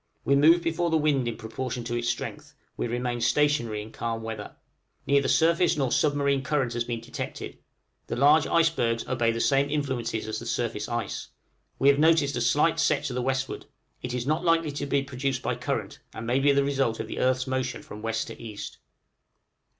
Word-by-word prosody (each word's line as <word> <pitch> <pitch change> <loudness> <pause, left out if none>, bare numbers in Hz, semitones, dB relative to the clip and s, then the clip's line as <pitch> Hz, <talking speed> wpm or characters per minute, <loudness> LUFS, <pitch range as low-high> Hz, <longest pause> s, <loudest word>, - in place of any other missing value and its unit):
We 140 - +4
move 165 +5 +5
before 170 +1 0
the 160 - +3
wind 145 -5 +1
in 115 - -3
proportion 120 +2 -5
to 120 +1 -4
its 120 0 -1
strength: - - -5 0.2
we - - -2
remain 120 0 -2
stationary 120 -4 +1
in 110 - -12
calm 115 -1 -4
weather. 110 -2 -6 0.5
Neither 140 -1 +3
surface 170 0 +3
nor 135 -4 0
submarine 140 -2 +2
current 135 -3 0
has 120 0 -1
been 115 -1 -4
detected; 115 - -6 0.5
the - - -3
large 145 +4 +5
icebergs 160 -9 +2
obey 120 -2 +1
the 115 - -3
same 140 +3 +2
influences 130 -7 -2
as 110 0 -3
the 115 - -8
surface 115 -3 -2
ice. 120 -3 -3 0.5
We 135 - +2
have 140 0 +4
noticed 155 -3 +4
a 120 - -1
slight 150 +7 +2
set 150 -3 +2
to 135 - -2
the 125 - -1
westward 130 +1 -2 0.3
it 125 0 -4
is 120 -1 -2
not 155 +5 0
likely 165 -3 +2
to 145 0 -4
be 140 0 +1
produced 135 -1 -3
by - - 0
current, - - -3 0.2
and 110 - -6
may 125 +3 +2
be 140 +1 +4
the 140 0 +3
result 135 -5 0
of 110 - -4
the - - -5
earth's 130 0 +2
motion 130 -1 -2
from 105 - -10
west 115 0 -1
to - - -10
east. 110 -3 -8
130 Hz, 200 wpm, -27 LUFS, 115-145 Hz, 0.5 s, move